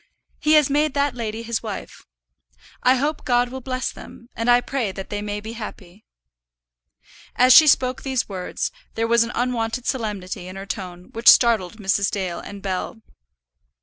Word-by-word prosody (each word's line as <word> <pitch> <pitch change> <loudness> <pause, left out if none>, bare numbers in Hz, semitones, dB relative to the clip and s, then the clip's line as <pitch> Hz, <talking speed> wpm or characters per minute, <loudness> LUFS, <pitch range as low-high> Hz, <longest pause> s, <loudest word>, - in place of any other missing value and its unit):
"He 305 - +2
has 300 -3 +6
made 295 0 +1
that 285 -1 +1
lady 230 -2 -5
his 230 -1 -2
wife. 215 -4 -8 0.7
I 255 - +4
hope 290 +4 -2
God 245 -1 +2
will 260 +1 -7
bless 255 0 -3
them, 235 - -13
and 230 +1 -1
I 245 0 +6
pray 245 -4 -2
that 190 0 -8
they 205 0 -3
may 205 0 -4
be 220 +2 -8
happy." 210 -3 -10 1.3
As 250 +1 +6
she 315 - +9
spoke 255 -2 +3
these 265 -3 -1
words, 185 -3 -4 0.2
there 225 - 0
was 235 0 +4
an 235 - -5
unwonted 240 0 -1
solemnity 205 -7 -3
in 185 - -9
her 195 0 -7
tone 180 -2 -7
which 230 +1 +5
startled 225 -4 +4
Mrs. 200 -1 +1
Dale 185 -4 -3
and 200 -1 -10
Bell. 195 +3 -4
230 Hz, 175 wpm, -22 LUFS, 200-255 Hz, 1.3 s, she